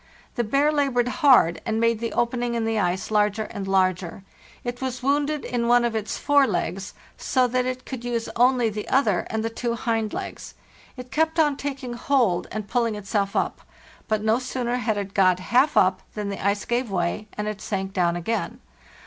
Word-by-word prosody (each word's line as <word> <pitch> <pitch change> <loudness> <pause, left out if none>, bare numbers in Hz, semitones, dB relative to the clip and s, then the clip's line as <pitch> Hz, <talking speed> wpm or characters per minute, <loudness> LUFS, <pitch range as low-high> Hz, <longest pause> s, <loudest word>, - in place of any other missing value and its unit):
The 240 - 0
bear 275 +7 +2
labored 270 -5 +1
hard, 255 - +5
and 220 0 -1
made 230 -1 +2
the 230 0 -3
opening 240 0 0
in 230 -1 -1
the 225 -1 0
ice 185 +2 -1
larger 210 0 +2
and 200 -2 -6
larger. 185 -1 0 0.4
It 245 +1 -5
was 255 -1 -4
wounded 290 +2 0
in 235 -1 -1
one 240 0 +4
of 235 - -1
its 215 -1 -2
fore 285 -2 +4
legs, 190 0 -3 0.2
so 255 -2 +2
that 250 +1 0
it 255 0 -4
could 255 -3 -6
use 235 -1 -2
only 245 -2 +3
the 210 0 -6
other, 225 -9 +2
and 220 0 -2
the 225 - -2
two 235 0 -2
hind 225 -2 -1
legs. - - -6 0.4
It 250 0 -9
kept 320 +1 +1
on 300 -3 +3
taking 270 -3 -5
hold 240 -7 +1
and 215 -1 -4
pulling 230 -2 0
itself 200 -1 -2
up. - - -1 0.5
But 215 -1 0
no 220 +2 +3
sooner 250 -1 -2
had 220 -3 -1
it 200 -1 -4
got 185 -2 +4
half 250 +10 +2
up 185 0 +4
than 210 -1 -3
the 200 - -5
ice 200 +1 0
gave 240 0 -1
way, 185 +3 -2
and 210 0 -4
it 210 -1 -4
sank 195 -2 -3
down 175 -3 +1
again. 200 +7 -3
230 Hz, 200 wpm, -24 LUFS, 200-250 Hz, 0.5 s, hard